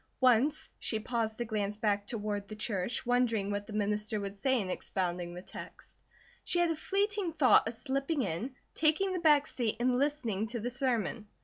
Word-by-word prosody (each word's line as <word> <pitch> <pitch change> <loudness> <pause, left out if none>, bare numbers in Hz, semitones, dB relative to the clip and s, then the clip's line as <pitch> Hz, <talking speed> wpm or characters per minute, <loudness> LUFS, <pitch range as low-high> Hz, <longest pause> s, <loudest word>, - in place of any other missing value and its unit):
Once 265 +6 +3
she 220 - -1
paused 220 -1 -2
to 240 - -2
glance 210 -2 -2
back 205 -1 0
toward 205 -3 -3
the 215 - -7
church, 210 0 -2
wondering 235 -5 +2
what 205 0 -3
the 215 - -8
minister 210 +1 0
would 200 -1 -4
say 260 +6 +1
in 195 - -2
expounding 175 -2 -2
that 180 - -8
text. - - -9 0.4
She - - +1
had 345 -1 +3
a - - 0
fleeting 400 +1 0
thought 280 -7 +5
of 225 - -2
slipping 275 +4 -1
in, 220 +8 -3 0.2
taking 320 +5 +2
the 365 - -1
back 300 -4 +5
seat 235 -4 -1
and 250 +1 +2
listening 245 -8 0
to 235 +1 -4
the 240 +3 -3
sermon. 235 -4 -1
230 Hz, 190 wpm, -32 LUFS, 205-275 Hz, 0.4 s, thought